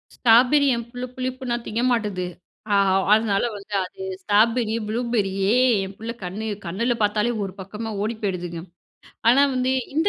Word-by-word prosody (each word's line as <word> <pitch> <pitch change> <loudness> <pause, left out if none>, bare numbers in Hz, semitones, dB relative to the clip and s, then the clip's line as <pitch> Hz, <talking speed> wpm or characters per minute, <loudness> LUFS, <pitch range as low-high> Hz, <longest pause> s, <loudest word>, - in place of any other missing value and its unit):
Strawberry, 250 +5 +5
என் 235 0 -5
புள்ள 245 +1 -5
புளிப்புனா 255 -1 -3
திங்க 225 +2 -1
மாட்டேங்குது. 210 -6 -1 0.5
அ - - +5 0.4
அதனால 215 -2 +2
வந்து 205 +1 -11
அது 185 - -10 0.2
ஸ்ட்ராபெர்ரி, 220 +3 +2
ப்ளூபெர்ரியி 210 -4 0 0.4
என் 195 +1 -9
பிள்ள 225 +1 -5
கண்ணு 195 +5 -5 0.2
கண்ணுல 235 +8 0
பார்த்தாலே 210 +3 +1
ஒரு 185 - -7
பக்கமா 215 +4 -6
ஓடி 225 +2 -2
போயிடுதுங்க. 175 -3 -3 0.7
ஆனா 260 +4 +6
வந்து 255 +1 +1 0.2
இந்த 330 +6 +3
225 Hz, 145 wpm, -23 LUFS, 200-240 Hz, 0.7 s, ஆனா